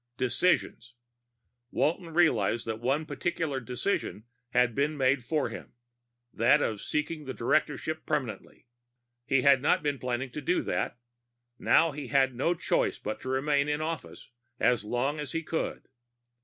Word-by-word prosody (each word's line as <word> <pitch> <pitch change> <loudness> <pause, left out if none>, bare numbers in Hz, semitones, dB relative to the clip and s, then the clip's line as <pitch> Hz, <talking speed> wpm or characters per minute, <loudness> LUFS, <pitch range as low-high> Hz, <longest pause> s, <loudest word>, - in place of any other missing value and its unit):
Decisions. 120 -3 0 0.7
Walton 165 +5 0
realized 120 - +3
that 110 -1 -3
one 135 +6 0
particular 160 -5 -2
decision 125 - -2 0.3
had 125 -2 +3
been 145 +4 0
made 130 -1 +2
for 150 -1 0
him, 115 - -9 0.6
that 120 +6 +4
of 110 -7 -1
seeking 150 0 -2
the 130 - -5
directorship 155 +4 0
permanently. 140 -7 -3 0.6
He 135 -1 +3
had 140 -2 +6
not 145 - +2
been 145 -2 -1
planning 125 +1 -2
to 150 - -5
do 180 +6 +1
that. - - -2 0.6
Now 165 -1 +4
he 145 -2 -6
had 135 +1 +3
no 150 +8 +1
choice - - 0
but 110 - -5
to 130 - -5
remain 140 +2 +1
in 150 0 0
office 160 -4 -5 0.3
as 125 -3 +3
long 125 +7 -1
as 145 -4 -4
he 165 - -2
could. 160 +1 -3
140 Hz, 150 wpm, -29 LUFS, 125-155 Hz, 0.7 s, had